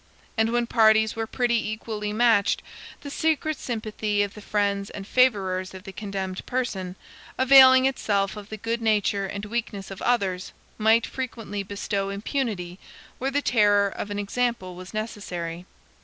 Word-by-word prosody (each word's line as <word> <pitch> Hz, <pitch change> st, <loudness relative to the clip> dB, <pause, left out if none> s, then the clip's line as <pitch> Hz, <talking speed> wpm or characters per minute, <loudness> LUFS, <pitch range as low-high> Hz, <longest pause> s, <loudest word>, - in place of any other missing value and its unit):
And 220 Hz, 0 st, +2 dB
when 240 Hz, 0 st, +1 dB
parties 220 Hz, -2 st, +4 dB
were 225 Hz, 0 st, -3 dB
pretty 235 Hz, -3 st, 0 dB
equally 215 Hz, -1 st, -4 dB
matched, 220 Hz, -2 st, +3 dB, 0.4 s
the 285 Hz, -, -7 dB
secret 310 Hz, 0 st, 0 dB
sympathy 215 Hz, -3 st, -1 dB
of 200 Hz, 0 st, -4 dB
the 210 Hz, -, -11 dB
friends 200 Hz, -1 st, -1 dB
and 195 Hz, -, -8 dB
favorers 190 Hz, -7 st, +1 dB
of 190 Hz, -, -10 dB
the 195 Hz, -, -8 dB
condemned 190 Hz, -1 st, -5 dB
person, 195 Hz, -8 st, -2 dB, 0.4 s
availing 260 Hz, 0 st, +8 dB
itself 205 Hz, -7 st, 0 dB
of 210 Hz, 0 st, -9 dB
the 215 Hz, -, -6 dB
good 230 Hz, +2 st, -2 dB
nature 205 Hz, -3 st, +1 dB
and 200 Hz, +2 st, -5 dB
weakness 210 Hz, -3 st, -4 dB
of 195 Hz, -, -8 dB
others, 195 Hz, -6 st, 0 dB, 0.3 s
might 220 Hz, +2 st, +4 dB
frequently 230 Hz, -6 st, -5 dB
bestow 200 Hz, 0 st, -3 dB
impunity 200 Hz, -4 st, -3 dB, 0.4 s
where 265 Hz, -, 0 dB
the 285 Hz, +1 st, 0 dB
terror 205 Hz, -3 st, +4 dB
of 205 Hz, -, -6 dB
an 205 Hz, -, -4 dB
example 205 Hz, -2 st, -1 dB
was 180 Hz, +1 st, -10 dB
necessary. 180 Hz, -6 st, -5 dB
210 Hz, 155 wpm, -25 LUFS, 195-235 Hz, 0.4 s, availing